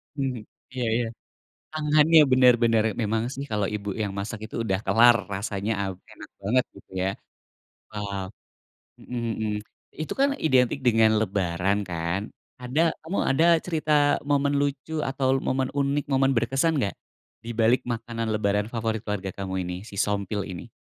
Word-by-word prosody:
Mhm, 135 -4 -2 0.3
iya 125 - -2
iya, 120 - +1 0.7
tangannya 155 +1 +5
bener 130 -1 +7
bener 115 -2 +4 0.2
memang 110 +1 0
sih 140 - -5
kalau 105 -2 0
ibu 105 -1 -4
yang 100 -2 -2
masak 105 +3 -4
itu - - -15
udah 95 -3 0
kelar 120 +1 +6 0.2
rasanya, 100 +1 -2
aw 95 -1 -2 0.2
enak - - -12
banget 125 +6 +2
gitu - - -16
ya, 95 - +1 0.8
wow. 100 -2 -4 0.8
Mhm 120 -2 -4
mhm, 110 -1 -1 0.5
itu 155 - -3
kan 275 +1 +4 0.2
identik 130 -1 +3
dengan 110 -1 +5
lebaran 95 -2 0
kan 85 +2 -2 0.4
ada 125 +6 0 0.2
kamu 165 +5 -4
ada 160 +5 +3 0.2
cerita 160 -3 -2 0.4
momen 140 0 +2
lucu 145 +2 -2
atau 135 0 +1
momen 130 0 0
unik 140 +1 0
momen 135 0 +3
berkesan 135 +7 +1
enggak 100 -9 -1 0.5
dibalik 115 +1 +2
makanan 115 -1 -3
lebaran 105 0 0
favorit 115 -1 -2
keluarga 100 -3 -3
kamu 95 -1 -5
ini 90 0 -4
si 100 - -10
Sompil 100 0 -1
ini? 85 - -8
115 Hz, 150 wpm, -25 LUFS, 100-135 Hz, 0.8 s, bener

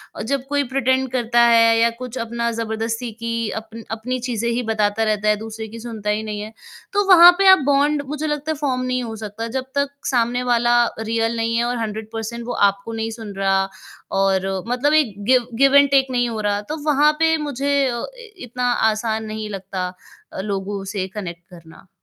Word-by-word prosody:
अ, - - -6
जब 275 -1 -1
कोई 285 0 +1
प्रिटेंड 260 0 +1
करता 240 -2 +2
है 230 -1 +5
या 230 0 +4
कुछ 255 0 -6
अपना 235 +1 -2
जबरदस्ती 225 +1 -3
की 230 -1 -2
अपन 225 +1 -11
अपनी 230 +3 -3
चीज़ें 235 -1 -1
ही 240 +1 -1
बताता 215 0 +1
रहता 215 -1 0
है, 210 - +4
दूसरे 220 0 -7
की 230 +2 -10
सुनता 220 -3 -5
ही 210 +1 0
नहीं 210 -1 -5
है, 215 +1 -7 0.4
तो 410 0 +2
वहाँ 350 -1 +10
पे 390 - +4
आप 380 - +8
बॉन्ड 285 +1 +2
मुझे 300 +2 -3
लगता 295 +1 -2
है 310 - -3
फ़ॉर्म 265 -3 -1
नहीं 255 0 -1
हो 225 -1 -6
सकता 215 +1 -6
जब 260 - -3
तक 280 0 +1 0.2
सामने 245 0 +1
वाला 240 0 +3 0.2
रियल 225 +1 -1
नहीं 230 0 0
है 235 - +2
और 245 0 -1
100% 225 +1 -5
वो 245 - -2 0.2
आपको 200 +3 -8
नहीं 225 0 -3
सुन 210 -3 -7
रहा 195 0 +2 0.5
और 190 -1 +1 0.2
मतलब 265 +5 +1
एक 295 -9 +3
गिव 255 -2 +4
गिव 275 0 +5
एंड 280 0 +7
टेक 270 -1 +4
नहीं 245 -1 +1
हो 220 -2 -4
रहा, 205 0 0
तो 305 +9 -6
वहाँ 300 0 +4
पे 325 0 +3
मुझे 280 0 0
अ, 235 -1 -3 0.3
इतना 245 -2 -2 0.2
आसान 220 0 -2
नहीं 215 0 -5
लगता, 190 -2 -4 0.5
अ, - - -4
लोगों 195 0 -4
से 190 -1 -1
कनेक्ट 170 -4 -6
करना। 170 +1 -15
230 Hz, 200 wpm, -21 LUFS, 215-260 Hz, 0.5 s, वहाँ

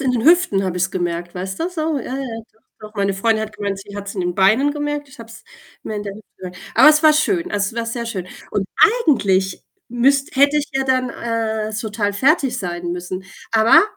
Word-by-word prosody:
in 265 -2 +1
den 240 -2 -1
Hüften 325 - +4
habe 180 -1 -2
ich's 185 +1 0
gemerkt, 175 -1 -3
weißt 190 +1 -5
du, 335 - 0
so, 320 -4 -2
ja, 255 +1 -5
ja, 275 - -3 0.6
doch, 215 - -10
doch. 210 - -26
Meine 200 -1 0
Freundin 220 +3 +1
hat 215 -1 -11
gemeint, 200 -2 -3
sie 200 0 -11
hat's 200 0 -6
in 185 - -2
den 175 0 -2
Beinen 220 +10 +4
gemerkt, 295 -1 -3
ich 270 - -16
habe 230 -1 -10
es 230 - -13 0.4
mehr 215 - -5
in 205 - -3
der 200 -1 -6
Hüfte 215 +1 -14
gemerkt. 180 0 -9 0.2
Aber - - +8
es 305 0 +5
war 310 -1 +7
schön, 335 +3 +1
also 205 -6 0
es 215 - -6
war 230 - -1
sehr 235 0 -4
schön. 190 -6 -4 0.2
Und 195 -2 -1 0.4
eigentlich 190 - +2 0.3
müsst 270 +3 +1
hätte 280 +2 +4
ich 295 0 -1
ja 270 0 0
dann, 255 -1 +1
äh, 220 -2 -3
total 210 -1 -2
fertig 270 - +2
sein 175 -3 -4
müssen, 180 +1 -5 0.3
aber 225 0 +6
220 Hz, 230 wpm, -20 LUFS, 195-270 Hz, 0.6 s, Aber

